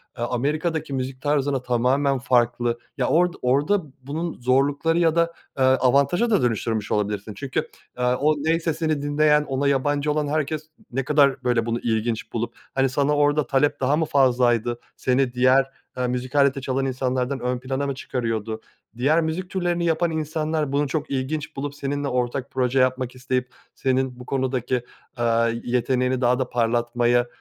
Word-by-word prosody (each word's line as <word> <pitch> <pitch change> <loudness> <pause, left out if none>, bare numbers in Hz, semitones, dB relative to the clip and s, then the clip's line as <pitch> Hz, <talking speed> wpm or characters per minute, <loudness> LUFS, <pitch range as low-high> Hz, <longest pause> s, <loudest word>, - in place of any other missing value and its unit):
A 120 - -2
Amerika'daki 155 +3 -1
müzik 130 0 -4
tarzına 145 -2 +1
tamamen 130 +3 +1
farklı, 120 -1 +1 0.2
ya - - +1
ord 175 +1 +3
orda 145 +11 +2 0.2
bunun 160 +5 -4
zorlukları 140 +6 +2
ya 165 -2 +3
da, 170 0 +2 0.2
aaa, 135 - +1
avantaja 140 - +2
da 210 -4 +3
dönüştürmüş 110 -2 -1
olabilirsin. 105 0 -1
Çünkü, 145 +6 -3 0.3
aaa, 125 0 +2
o 150 +3 +2
ney 165 +1 +2
sesini 160 -2 -1
dinleyen, 150 +1 +3
ona 135 0 -1
yabancı 145 +2 +1
olan 150 0 0
herkes 155 +1 -2 0.2
ne 135 +3 -1
kadar 140 -3 +3
böyle 120 -2 +1
bunu 115 0 -1
ilginç 110 0 -2
bulup 115 0 -3 0.2
hani 135 0 +2
sana 140 +2 +1
orda 145 -1 +2
talep 145 +3 +1
daha 135 +2 +2
mı 160 - +1
fazlaydı? 120 -4 +2 0.2
Seni 130 -1 +1
diğer, 130 +2 +4 0.3
aaa, 125 0 -1
müzik 125 +2 -4
aleti 140 -1 +3
çalan 130 +1 -1
insanlardan 130 0 -1
ön 125 +1 -2
plana 130 +2 -2
mı 140 - -2
çıkarıyordu? 115 -4 -3 0.4
Diğer 150 +7 +3
müzik 165 +3 -3
türlerini 175 -2 -1
yapan 165 +1 +1
insanlar 155 -1 -2
bunu 145 +1 +1
çok 145 +2 -3
ilginç 145 +3 -3
bulup, 140 +1 -4
seninle 145 0 -3
ortak 125 0 -2
proje 130 0 +1
yapmak 130 0 +1
isteyip, 125 0 -2 0.2
senin 130 -1 0
bu 125 - -9
konudaki, 130 -2 -1 0.4
aaa, 115 -1 +2 0.2
yeteneğini 125 +1 0
daha 125 +1 +3
da 130 -2 -1
parlatmaya, 120 +1 +1
135 Hz, 160 wpm, -23 LUFS, 125-150 Hz, 0.4 s, diğer